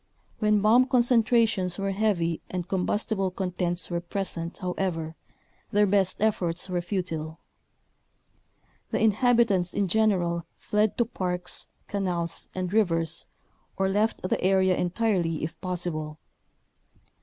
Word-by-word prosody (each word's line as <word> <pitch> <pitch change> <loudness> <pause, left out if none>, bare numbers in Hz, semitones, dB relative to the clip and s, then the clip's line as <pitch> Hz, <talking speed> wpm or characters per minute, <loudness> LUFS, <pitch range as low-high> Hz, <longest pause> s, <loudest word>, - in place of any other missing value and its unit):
When 210 -1 +3
bomb 235 +5 +5
concentrations 230 -7 +3
were 195 0 -1
heavy 190 -5 0
and 180 -1 -4
combustible 195 +1 0
contents 180 -1 -2
were 170 0 -1
pres 195 +2 -3
ent, 170 0 -5
however, 175 -3 -3 0.5
their 205 0 +3
best 195 -2 +2
efforts 180 -5 0
were 180 -2 -1
futile. 165 -4 -3 1.5
The - - -1
inhabitants, 220 -4 +3
in 200 -1 +1
general, 175 -5 +1
fled 210 0 0
to 235 - +3
parks, 180 -5 -4 0.2
canals, 180 -4 -2
and 185 0 -3
rivers, 165 -6 +1 0.5
or 190 0 +1
left 210 +3 0
the 185 - -1
area 190 -1 +3
entirely 175 -4 0
if 155 - -5
possible. 165 -4 -2
185 Hz, 120 wpm, -27 LUFS, 175-210 Hz, 1.5 s, bomb